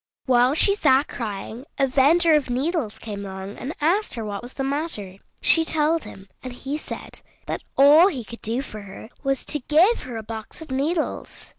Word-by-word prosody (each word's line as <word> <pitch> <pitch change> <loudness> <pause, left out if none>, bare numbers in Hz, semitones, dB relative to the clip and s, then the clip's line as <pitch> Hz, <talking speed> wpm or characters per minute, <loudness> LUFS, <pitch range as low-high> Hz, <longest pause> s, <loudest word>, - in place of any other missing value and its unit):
While 250 +1 +4
she 400 +5 +6
sat 285 -7 +3
crying, 225 +3 -6
a 275 - +3
vender 300 +6 +4
of 295 -4 +2
needles 265 - -1
came 205 -2 -7
along 190 +1 -7
and 280 +6 -5
asked 350 +7 +1
her 225 -2 -4
what 205 -1 -5
was 245 +1 -10
the 270 - -3
matter. 270 - -3 0.2
She 325 - +5
told 315 0 +1
him, 190 0 -11
and 255 -1 -7
he 270 +3 -5
said 305 - -8 0.2
that - - -4 0.2
all 295 +6 +8
he 275 -11 -3
could 235 +2 -10
do 235 +4 -1
for 215 -5 -9
her 200 +3 -11
was 275 -1 -1
to 295 - -1
give 330 - +3
her 245 -3 -7
a 220 - -6
box 220 0 -8
of 320 -4 -10
needles. 310 +5 -2
270 Hz, 195 wpm, -23 LUFS, 225-310 Hz, 0.2 s, all